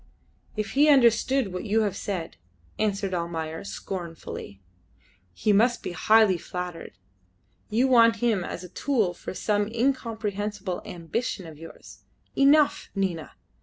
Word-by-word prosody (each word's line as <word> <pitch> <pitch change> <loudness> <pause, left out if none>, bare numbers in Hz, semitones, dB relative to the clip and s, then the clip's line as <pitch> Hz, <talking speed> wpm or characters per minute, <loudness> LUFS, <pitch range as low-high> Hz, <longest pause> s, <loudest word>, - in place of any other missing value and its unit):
"If 215 -1 -3
he 295 +3 +4
understood 250 -4 +4
what 180 - -4
you 220 +1 +2
have 205 -3 0
said," 180 -5 -4 0.4
answered 200 -2 0
Almayer, 165 -2 -3
scornfully, 170 - -7 0.7
"he 210 - +1
must 235 +4 +3
be - - -4
highly 205 +1 +4
flattered. 180 - -6 0.7
You 240 +5 +2
want 230 -3 +6
him 225 -4 +1
as 175 - -6
a 180 - -9
tool 220 -4 0
for 180 - -8
some 205 0 0
incomprehensible 215 -5 -2
ambition 180 +3 -4
of 155 -2 -11
yours. 165 - -12 0.4
Enough, 290 +2 +4
Nina. 185 -5 -2
205 Hz, 130 wpm, -26 LUFS, 180-230 Hz, 0.7 s, want